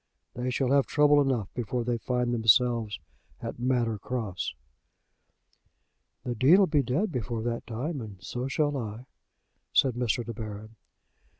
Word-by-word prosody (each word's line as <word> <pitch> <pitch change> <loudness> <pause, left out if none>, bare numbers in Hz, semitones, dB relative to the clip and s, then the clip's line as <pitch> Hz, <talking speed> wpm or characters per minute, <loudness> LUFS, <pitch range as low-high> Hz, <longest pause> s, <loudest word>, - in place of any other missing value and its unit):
They 125 +1 -3
shall 130 +1 0
have 140 -1 +4
trouble 145 0 +5
enough 125 -8 -1
before 120 0 -2
they 120 0 -1
find 125 -1 -1
themselves 115 -1 +3 0.4
at - - -6
Manor 120 -3 0
Cross." 110 -6 -3 1.7
"The 125 - -2
Dean'll 160 - +6
be 150 -4 +2
dead 150 - 0
before 120 -4 -3
that 115 0 -3
time; 130 +6 -3
and 105 -4 -8
so 125 +7 -4
shall 145 +1 0
I," 115 0 -6 0.7
said 130 -2 +3
Mr. 120 -1 -1
De 115 - -5
Baron. 110 0 -8
120 Hz, 140 wpm, -28 LUFS, 115-130 Hz, 1.7 s, Dean'll